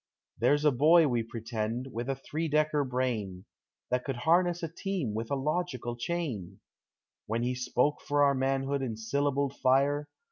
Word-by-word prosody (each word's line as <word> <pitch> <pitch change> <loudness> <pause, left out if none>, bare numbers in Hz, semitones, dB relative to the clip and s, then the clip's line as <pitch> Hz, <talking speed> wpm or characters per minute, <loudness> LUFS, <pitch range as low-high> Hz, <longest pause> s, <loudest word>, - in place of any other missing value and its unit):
There's 145 +1 +3
a 150 - +6
boy, 155 +5 +5
we 120 -3 +1
pretend, 115 +2 -4
with 120 +3 -4
a 135 - 0
three 155 +4 -4
decker 150 -1 +2
brain. 120 -8 -2 0.5
That 125 0 +1
could 135 - -3
harness 175 +6 +2
a - - 0
team 170 - -3
with 110 +1 -3
a 140 - 0
logical 135 -4 -2
chain; 120 - -4 0.7
When 115 +2 -1
he 125 +1 0
spoke 125 +3 0
for 145 0 +2
our 140 -1 +5
manhood 135 +1 0
in 115 -5 -3
syllabled 140 +4 0
fire. 140 +3 +2
135 Hz, 165 wpm, -30 LUFS, 120-150 Hz, 0.7 s, a